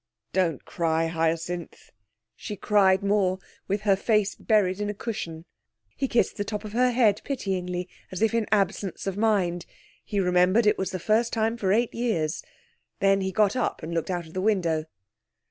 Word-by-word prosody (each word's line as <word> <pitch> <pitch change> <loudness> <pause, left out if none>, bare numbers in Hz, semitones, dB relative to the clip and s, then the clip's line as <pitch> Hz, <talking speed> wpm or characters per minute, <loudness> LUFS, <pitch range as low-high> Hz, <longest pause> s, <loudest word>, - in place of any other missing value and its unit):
'Don't 170 -7 0
cry, 165 -1 0
Hyacinth.' 165 +1 -2 0.4
She 210 - -6
cried 195 -1 +3
more, 200 -2 +2 0.3
with 200 +1 -1
her 205 -2 +3
face 210 0 +1
buried 205 -3 +1
in 205 - -1
a 210 - -4
cushion. 170 -7 -5 0.5
He 270 - -1
kissed 235 -2 +1
the 205 - -1
top 210 +1 -5
of 210 - -7
her 250 +2 +3
head 230 -5 +3
pityingly, 180 -8 -3 0.2
as 185 +3 -2
if 225 - +2
in 230 -2 +1
absence 195 -3 0
of 195 -1 -2
mind. 195 -5 +1 0.4
He 205 - -2
remembered 180 +4 +3
it 210 - +3
was 190 - -1
the 185 - -3
first 220 +6 +1
time 225 0 0
for 195 -5 0
eight 230 +3 +2
years. 170 -11 -1 0.6
Then 195 0 +3
he 190 0 -1
got 205 +2 +2
up 250 - -1
and 165 +2 -5
looked 165 +1 -2
out 175 -2 -2
of 160 - -14
the 185 - -2
window. 175 -7 +1
195 Hz, 180 wpm, -26 LUFS, 180-215 Hz, 0.6 s, cried